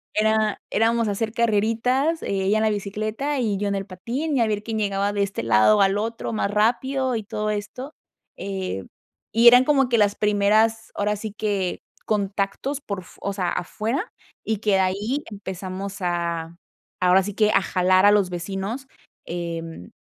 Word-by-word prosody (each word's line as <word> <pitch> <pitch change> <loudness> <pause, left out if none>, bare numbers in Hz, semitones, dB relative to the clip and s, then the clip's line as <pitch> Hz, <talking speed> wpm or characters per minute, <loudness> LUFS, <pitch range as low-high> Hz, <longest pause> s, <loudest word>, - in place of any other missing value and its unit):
era 215 0 +2
éramos 230 +1 +2
a - - 0
hacer 220 +2 -2
carreritas, 235 +7 +1
eh, - - -4 0.2
ella 210 +3 +3
en 220 - +1
la 220 - +3
bicicleta 215 +8 -2
y 215 -5 0
yo 205 +1 -1
en 200 - 0
el 195 0 -3
patín, 240 - -3
y 255 - +2
a 225 - +3
ver 210 -1 -2
quién 220 -1 -3
llegaba 200 0 0
de 205 - 0
este 195 - -3
lado 115 - +5
al 195 +1 +3
otro 230 +1 -3
más 210 - 0
rápido 250 +5 +1
y 220 - -3
todo 210 +1 -3
esto, 235 +8 -5 0.4
eh, 190 - -4 0.5
y 230 +2 +5
eran 245 +1 +9
como 270 -3 +3
que 235 - +3
las 205 -1 +3
primeras, 215 +2 +2
ahora 210 +1 0
sí 210 0 -6
que 200 -4 -1 0.2
contactos 205 +7 -1
por 200 -7 -5
f - - -17
o 200 - -2
sea, 185 -3 -1
afuera, 225 - -3 0.3
y 220 - -1
que 210 +1 0
de 195 - +4
ahí 205 +10 0
empezamos 195 -1 -6
a 170 -2 -2 0.5
ahora 180 +1 +5
sí 205 +2 -5
que 215 -1 +3
a - - +4
jalar 185 +1 +3
a 205 - +7
los 205 -3 +3
vecinos. 195 +9 -4 0.4
Em, 165 - -6
210 Hz, 185 wpm, -23 LUFS, 195-225 Hz, 0.5 s, eran